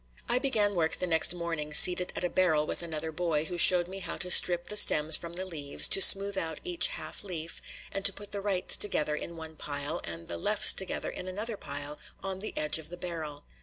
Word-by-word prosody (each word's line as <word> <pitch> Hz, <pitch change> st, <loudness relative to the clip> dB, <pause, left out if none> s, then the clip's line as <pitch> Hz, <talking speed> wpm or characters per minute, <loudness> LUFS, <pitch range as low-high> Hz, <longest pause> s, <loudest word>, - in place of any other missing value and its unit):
I 245 Hz, -, 0 dB
began 215 Hz, -7 st, -1 dB
work 160 Hz, -3 st, -2 dB
the -, -, -5 dB
next 160 Hz, -2 st, +3 dB
morning 165 Hz, -3 st, -4 dB
seated 180 Hz, +2 st, +6 dB
at -, -, -6 dB
a 180 Hz, -, -2 dB
barrel 160 Hz, -5 st, -1 dB
with -, -, -2 dB
another 160 Hz, -1 st, -7 dB
boy, 160 Hz, -2 st, -4 dB
who 175 Hz, +1 st, -7 dB
showed 175 Hz, 0 st, +4 dB
me 190 Hz, +1 st, -9 dB
how -, -, -7 dB
to 180 Hz, -, -2 dB
strip 175 Hz, -1 st, +5 dB
the 210 Hz, -, -6 dB
stems 155 Hz, -6 st, +4 dB
from 170 Hz, 0 st, -7 dB
the 185 Hz, +2 st, -2 dB
leaves, 150 Hz, -6 st, +1 dB
to 195 Hz, -, +3 dB
smooth 195 Hz, 0 st, +8 dB
out 160 Hz, -1 st, -6 dB
each 355 Hz, +3 st, -1 dB
half -, -, -9 dB
leaf, 170 Hz, -4 st, -9 dB, 0.3 s
and 195 Hz, -, -6 dB
to 200 Hz, -, +7 dB
put 205 Hz, +1 st, -13 dB
the 200 Hz, -, -5 dB
"rights" 195 Hz, -2 st, -2 dB
together 155 Hz, -7 st, 0 dB
in 170 Hz, +2 st, -9 dB
one 160 Hz, 0 st, -11 dB
pile, 145 Hz, 0 st, -5 dB
and 85 Hz, 0 st, -9 dB
the 85 Hz, -1 st, -7 dB
"lefts" 210 Hz, -, +3 dB
together 190 Hz, -, -5 dB
in 180 Hz, -, -10 dB
another 210 Hz, +5 st, -5 dB
pile 145 Hz, -4 st, -8 dB, 0.2 s
on 190 Hz, -1 st, -6 dB
the 215 Hz, -, -6 dB
edge 150 Hz, +1 st, -1 dB
of 155 Hz, -, -11 dB
the 175 Hz, -, -10 dB
barrel. 160 Hz, -5 st, -8 dB
175 Hz, 230 wpm, -27 LUFS, 155-195 Hz, 0.3 s, smooth